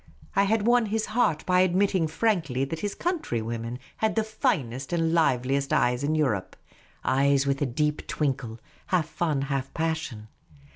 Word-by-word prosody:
I 200 - +4
had 215 +1 +1
won 240 -1 +4
his 220 +1 -1
heart 195 -10 +2
by 180 0 +3
admitting 185 -1 +2
frankly 160 - 0
that 160 +4 -5
his 205 +2 -3
countrywomen 120 - -2 0.2
had 220 -1 0
the 220 - +2
finest 135 - -1
and 165 -1 +1
liveliest 135 -3 +1
eyes 125 +2 +2
in 155 +2 +1
Europe 130 -12 0 0.3
— - - -31
eyes 140 +1 +3
with 140 0 0
a 145 - +2
deep 150 +4 -1
twinkle, 130 -6 -2 0.3
half 175 -4 +1
fun, 155 -4 -1
half 135 -1 -2
passion. 160 -9 -2
155 Hz, 160 wpm, -26 LUFS, 135-185 Hz, 0.3 s, I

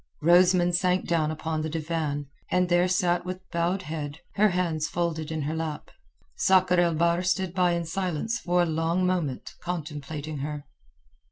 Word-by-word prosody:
Rosamund 175 +1 +5
sank 180 +1 +1
down 160 -3 +1
upon 155 0 -3
the 155 - -2
divan, 155 -2 -2 0.2
and 180 0 +2
sat - - -12
there 175 0 +2
with 185 +1 -7
bowed 175 +3 0
head, 150 -2 -5 0.2
her 210 +2 +4
hands 170 -4 0
folded 160 -2 -2
in 155 -2 -2
her 150 +3 -2
lap. 160 -2 -4 0.4
Sakr 185 -1 +4
el 170 -2 +3
Bahr 170 +2 +2
stood 185 0 0
by 180 -2 +2
in 170 -1 -1
silence 185 +6 -2
for 175 0 +2
a - - +2
long 165 +3 0
moment 175 -8 -2
contemplating 155 -3 -5
her. 150 +1 -5
170 Hz, 165 wpm, -27 LUFS, 155-180 Hz, 0.4 s, Rosamund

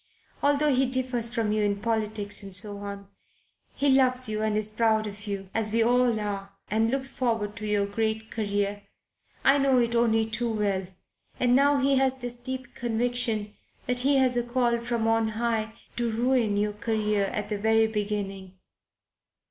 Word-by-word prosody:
Although 290 0 +3
he 260 +1 +2
differs 250 -2 -1
from 225 -3 0
you 215 0 +1
in 200 -1 0
politics 215 -2 -2
and 195 -2 -5
so 205 +2 +3
on, 200 -1 -7 0.7
he 285 - 0
loves 255 -2 +3
you 215 0 -2
and 215 -1 0
is 215 0 +2
proud 220 0 +2
of 205 0 -8
you 195 -2 -5
as 220 -1 -1
we 230 +1 +3
all 245 -1 +3
are 200 -1 -4 0.2
and 220 +1 +2
looks 270 +1 -2
forward 225 -5 -1
to 215 0 -5
your 205 -1 +1
great 220 +2 -2
career 205 -1 -2 0.6
I 275 +1 +5
know 270 -2 +3
it 235 -1 +2
only 225 -1 +3
too 230 +1 -2
well. 200 -3 -1 0.5
And 245 0 +3
now 285 +2 +4
he 275 0 +2
has 265 0 +2
this 245 -2 -3
deep 260 0 -6
conviction 235 -2 -1 0.3
that 250 -1 0
he 275 +3 +3
has 260 -2 +4
a 240 - +2
call 240 -1 +1
from 235 -1 -1
on 225 0 +2
High 225 -2 -1 0.2
to 240 -1 0
ruin 230 -2 +1
your 210 0 0
career 210 -1 0
at 210 +1 -4
the 210 -2 -2
very 220 +1 +3
beginning. 200 -3 -4
225 Hz, 180 wpm, -27 LUFS, 210-245 Hz, 0.7 s, I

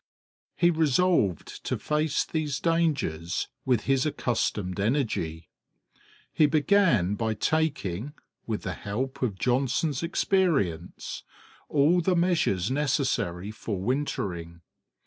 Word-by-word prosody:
He 175 0 +4
resolved 160 - +1
to - - -1
face 150 0 0
these 150 -3 -2
dangers 140 - 0 0.2
with 125 -5 +2
his 135 +1 +1
accustomed 105 - -1
energy. 100 - -1 0.9
He 155 - +5
began 150 - +3
by 110 +1 -1
taking, 140 - -1 0.3
with 110 -2 -3
the - - -3
help 125 +7 -4
of 110 -7 -1
Johnson's 130 - 0
experience, 165 - 0 0.5
all 155 +5 +4
the 180 +2 +2
measures 165 - +1
necessary 130 - 0
for 110 -2 -4
wintering. 90 - -3
130 Hz, 105 wpm, -27 LUFS, 100-155 Hz, 0.9 s, He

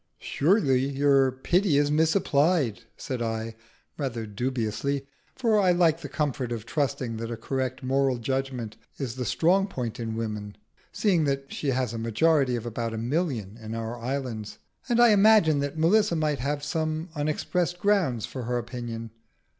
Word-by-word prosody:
"Surely 145 - +2
your 140 -1 +3
pity 170 +5 +1
is 145 0 +2
misapplied," 155 - +2 0.2
said 130 -2 -4
I, 115 0 -3 0.4
rather 120 -5 -3
dubiously, 125 +4 -2 0.3
for 225 -4 +2
I 185 -3 +4
like 170 -2 +3
the 145 - -6
comfort 135 -5 -2
of 115 -2 -4
trusting 135 -5 -2
that 115 0 -4
a 115 - -4
correct 130 +2 -3
moral 135 0 +1
judgment 125 -2 -3 0.2
is 130 -5 -3
the 125 0 -4
strong 175 +10 +2
point 125 - -5
in 115 -1 -3
woman 105 -2 -4 0.4
(seeing 180 -7 +2
that 135 -1 -2
she 150 - -4
has 130 -3 0
a 115 - -4
majority 125 +4 +2
of 120 -1 -4
about 115 -1 -3
a - - -4
million 120 - -2
in 110 +1 -6
our 115 +1 -4
islands), 120 -3 -4 0.3
and 240 -1 +2
I 240 -1 +7
imagined 205 -8 +5
that 140 +2 -3
Melissa 175 +3 +3
might 155 -3 0
have 145 +3 -2
some 155 +2 -2
unexpressed 170 +3 -1
grounds 175 - +1
for 130 -3 -6
her 125 +1 -1
opinion. 120 -1 -5
135 Hz, 160 wpm, -26 LUFS, 115-160 Hz, 0.4 s, I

